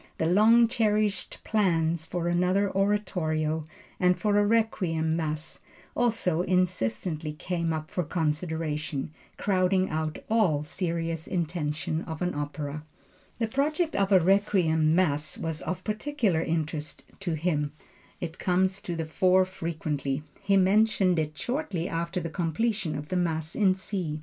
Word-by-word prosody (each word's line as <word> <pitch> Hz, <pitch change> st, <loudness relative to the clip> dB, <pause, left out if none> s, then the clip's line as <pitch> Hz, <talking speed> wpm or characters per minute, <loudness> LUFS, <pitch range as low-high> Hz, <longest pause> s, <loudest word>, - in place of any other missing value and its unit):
The 160 Hz, -, 0 dB
long 220 Hz, +7 st, +6 dB
cherished 215 Hz, -4 st, 0 dB
plans 170 Hz, -6 st, +1 dB
for 175 Hz, -1 st, -2 dB
another 180 Hz, +3 st, +2 dB
oratorio, 175 Hz, -6 st, 0 dB, 0.4 s
and 180 Hz, 0 st, +3 dB
for 210 Hz, -2 st, +1 dB
a -, -, +4 dB
Requiem 180 Hz, -8 st, +1 dB
Mass 155 Hz, -1 st, -3 dB, 0.4 s
also 220 Hz, -8 st, +1 dB
insistently 170 Hz, -4 st, 0 dB
came 170 Hz, +1 st, -2 dB
up 155 Hz, -1 st, -3 dB
for 180 Hz, -, -1 dB
consideration, 155 Hz, -2 st, -2 dB, 0.3 s
crowding 185 Hz, -1 st, +2 dB
out 155 Hz, 0 st, -2 dB
all 195 Hz, -10 st, +2 dB
serious 165 Hz, -1 st, -2 dB
intention 160 Hz, -2 st, -2 dB
of 160 Hz, -1 st, -6 dB
an 180 Hz, -, 0 dB
opera. 145 Hz, 0 st, -4 dB, 0.5 s
The 225 Hz, -, 0 dB
project 300 Hz, +7 st, 0 dB
of 195 Hz, 0 st, +1 dB
a 190 Hz, -, +7 dB
Requiem 175 Hz, -4 st, +3 dB
Mass 155 Hz, -4 st, +1 dB
was 160 Hz, -1 st, -3 dB
of 185 Hz, 0 st, -4 dB
particular 215 Hz, -, 0 dB
interest 160 Hz, -2 st, -3 dB, 0.2 s
to 175 Hz, -5 st, -2 dB
him; 150 Hz, -3 st, 0 dB, 0.5 s
it 165 Hz, -1 st, -6 dB
comes 185 Hz, +2 st, +1 dB
to 175 Hz, -, -4 dB
the 165 Hz, -1 st, -2 dB
fore 185 Hz, +3 st, +3 dB
frequently. 155 Hz, -6 st, -3 dB, 0.2 s
He 195 Hz, 0 st, +3 dB
mentioned 190 Hz, -2 st, +3 dB
it 155 Hz, -1 st, -3 dB
shortly 245 Hz, -, -2 dB
after 170 Hz, +1 st, -2 dB
the 165 Hz, -2 st, -5 dB
completion 180 Hz, +3 st, -1 dB
of 145 Hz, +1 st, -6 dB
the 185 Hz, -, 0 dB
Mass 160 Hz, -2 st, -1 dB
in 195 Hz, -3 st, +4 dB
C. 180 Hz, -5 st, -4 dB
175 Hz, 140 wpm, -27 LUFS, 155-195 Hz, 0.5 s, a